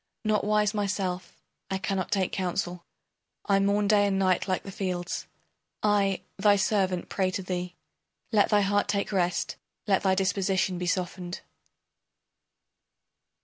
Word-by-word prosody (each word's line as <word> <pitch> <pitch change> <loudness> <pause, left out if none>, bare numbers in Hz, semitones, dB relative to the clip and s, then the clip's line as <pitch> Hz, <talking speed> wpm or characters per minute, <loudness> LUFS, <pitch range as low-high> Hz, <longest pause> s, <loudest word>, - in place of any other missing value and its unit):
Not 215 0 +2
wise 210 0 +2
myself, 190 -4 -2 0.3
I 190 - -1
cannot 190 -1 -2
take 190 -2 +1
counsel; 180 -1 -2 0.6
I 200 -1 +3
mourn 200 +1 +2
day 205 -1 +4
and 195 -1 +1
night 185 -1 +2
like 185 -1 0
the 195 - -7
fields. 180 -2 -3 0.6
I, 200 -2 +2 0.2
thy 205 +1 +5
servant, 190 -3 +1
pray 190 -2 0
to 190 0 -3
thee. 180 -1 -4 0.6
Let 210 -3 +4
thy 210 -1 +4
heart 205 +1 +2
take 200 0 -1
rest, 180 -3 0 0.3
let 195 -2 +2
thy 190 -1 +3
disposition 190 -1 +1
be 180 - -3
softened. 180 0 -2
195 Hz, 140 wpm, -27 LUFS, 185-205 Hz, 0.6 s, thy